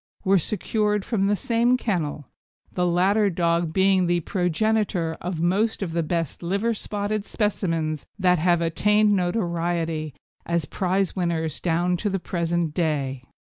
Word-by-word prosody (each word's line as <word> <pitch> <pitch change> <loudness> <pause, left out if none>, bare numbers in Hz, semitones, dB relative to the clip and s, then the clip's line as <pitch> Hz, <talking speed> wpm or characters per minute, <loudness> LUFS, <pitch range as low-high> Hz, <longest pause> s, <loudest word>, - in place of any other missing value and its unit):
were 195 0 +4
secured 210 +2 -1
from 200 -5 0
the 205 - +2
same 235 +4 +2
kennel, 160 - -2 0.5
the 180 -1 +1
latter 195 +4 +3
dog 170 -2 0
being 190 0 +3
the 175 0 +2
progenitor 180 0 0
of 175 -2 -3
most 205 +5 +1
of 175 - -4
the 170 - +1
best 165 -1 -2
liver 200 +7 0
spotted 205 0 -3
specimens 165 -8 -1
that 180 -3 +3
have 175 +1 +2
attained 210 +5 +3
notoriety 170 - -1 0.3
as 170 -2 -1
prize 185 +3 -1
winners 165 -4 -1
down 175 +1 +1
to 205 +4 -1
the 195 - 0
present 170 -2 -1
day. 140 -6 -1
180 Hz, 140 wpm, -24 LUFS, 165-205 Hz, 0.5 s, were